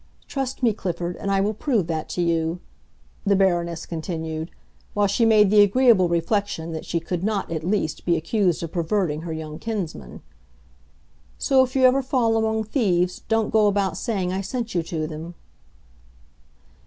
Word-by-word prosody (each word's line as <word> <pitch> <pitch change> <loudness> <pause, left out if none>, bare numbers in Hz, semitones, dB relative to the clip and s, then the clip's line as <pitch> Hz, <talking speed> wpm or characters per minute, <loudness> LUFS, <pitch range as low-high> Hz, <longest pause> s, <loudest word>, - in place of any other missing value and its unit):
Trust 270 -2 -4
me, 230 -3 +4
Clifford, 175 -3 -3
and 200 - -4
I 195 0 +2
will 210 +2 0
prove 220 - 0
that 160 -1 -3
to 175 - -1
you," 165 0 0 0.6
the 200 -1 +3
Baroness 175 -3 +1
continued, 160 -1 -4 0.5
while 205 0 +3
she 200 +4 +2
made 210 -3 +5
the 210 -1 +7
agreeable 205 -3 +5
reflection 170 -1 -1
that 160 -1 -6
she 170 - 0
could 170 +1 -4
not, 205 -4 -1
at 160 -1 -3
least, 175 -4 -1
be 170 -1 +2
accused 175 +1 0
of 165 - -5
perverting 170 -3 -1
her 165 0 -6
young 155 -1 -6
kinsman. 175 - -5 1.1
"So 265 -1 +4
if 255 0 -5
you 265 - +3
ever 260 +2 +5
fall 245 -4 +1
among 220 0 +1
thieves 185 -7 0
don't 225 -1 +1
go 215 -1 +4
about 195 -4 +1
saying 190 -3 -2
I 190 - -1
sent 230 +3 -4
you 175 - +1
to 165 -1 -3
them." 160 +2 -7
190 Hz, 170 wpm, -23 LUFS, 165-220 Hz, 1.1 s, the